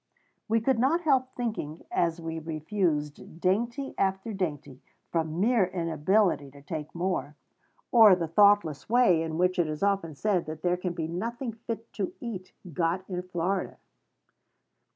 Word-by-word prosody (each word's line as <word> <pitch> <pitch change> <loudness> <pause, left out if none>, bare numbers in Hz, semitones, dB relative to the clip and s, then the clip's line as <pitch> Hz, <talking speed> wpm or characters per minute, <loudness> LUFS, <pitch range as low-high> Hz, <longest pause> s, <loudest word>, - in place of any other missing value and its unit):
We 225 +1 +3
could 255 0 +2
not 290 +8 +3
help 270 -6 +3
thinking, 215 -11 -4
as 170 0 +1
we 165 0 -4
refused 155 -1 -2
dainty 235 +9 0
after 195 +3 0
dainty, 150 -8 -4 0.3
from 160 0 -1
mere 225 0 +4
inability 170 -1 +1
to 140 +1 -15
take 155 +1 -6
more, 170 -5 -2 0.6
of 220 -6 +8
the 170 -2 -2
thoughtless 200 -3 +3
way 230 -9 +4
in 160 -1 -3
which 180 +1 +2
it 170 - +3
is 155 +3 -4
often 195 -6 0
said 185 0 0
that 155 0 -7
there 180 0 +2
can 180 -1 -3
be 165 -2 -3
nothing 230 +8 -4
fit 225 0 -7
to 195 -3 -3
eat 200 -6 -6 0.2
got 175 +4 -1
in 180 -2 -3
Florida. 180 +1 -2
180 Hz, 150 wpm, -28 LUFS, 160-215 Hz, 0.6 s, of